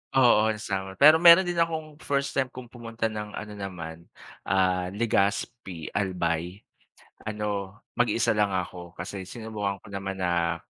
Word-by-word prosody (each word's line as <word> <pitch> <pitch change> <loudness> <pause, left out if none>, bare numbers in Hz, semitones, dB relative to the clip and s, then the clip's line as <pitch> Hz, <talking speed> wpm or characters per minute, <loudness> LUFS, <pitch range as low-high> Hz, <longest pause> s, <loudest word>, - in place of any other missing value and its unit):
Oo 115 -4 +5
sinama 95 -3 -4
pero 155 +2 +9
meron 175 +2 +9
din 175 - -1
akong 160 -2 -1
first 140 0 -1
time 130 -2 0
kung 125 -1 -9
pumunta 115 -1 -4
ng 105 -1 -6
ano 105 0 -7
naman, 85 -5 -7 0.4
ah, 90 -1 +1
Legaspi, 100 -3 -1
Albay. 90 -2 -1 0.7
Ano 105 -2 -3 0.2
mag-isa 120 -1 +2
lang 105 -1 +2
ako 90 -2 -5
kasi 95 +1 -6
sinubukan 110 -3 -4
ko 100 - -12
naman 95 0 -4
na 85 -2 0
100 Hz, 140 wpm, -27 LUFS, 95-120 Hz, 0.7 s, pero